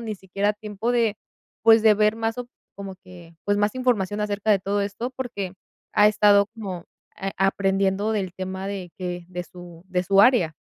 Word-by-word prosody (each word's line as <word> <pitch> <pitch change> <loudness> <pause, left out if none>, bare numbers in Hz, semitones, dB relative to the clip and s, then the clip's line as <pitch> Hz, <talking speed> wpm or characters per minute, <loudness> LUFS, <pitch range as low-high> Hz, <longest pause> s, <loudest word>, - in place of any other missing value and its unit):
ni 220 -2 -4
siquiera 195 +2 -1
tiempo 210 +3 -3
de, 230 -3 +1 0.5
pues, 225 0 +6
de 220 -1 +6
ver 210 +1 +3
más 225 +1 -2
op 245 -1 -5 0.3
como 195 -1 -7
que, 180 -3 -15
pues, 205 0 +1
más 205 +2 +1
información 210 -6 0
acerca 210 0 -1
de 200 - +2
todo 200 +2 -1
esto, 205 +5 -4
porque 240 -8 -5 0.4
ha 210 - +5
estado 205 -1 +4
como, 190 -6 -6 0.3
a 195 0 -3
aprendiendo 195 +2 +1
del 190 -4 -2
tema 190 0 -5
de 185 -4 -6
que 180 -1 -4
de 180 -1 -5
su 175 -2 -13
de 180 -1 0
su 195 +1 +4
área. 220 -10 +4
200 Hz, 185 wpm, -24 LUFS, 190-215 Hz, 0.5 s, pues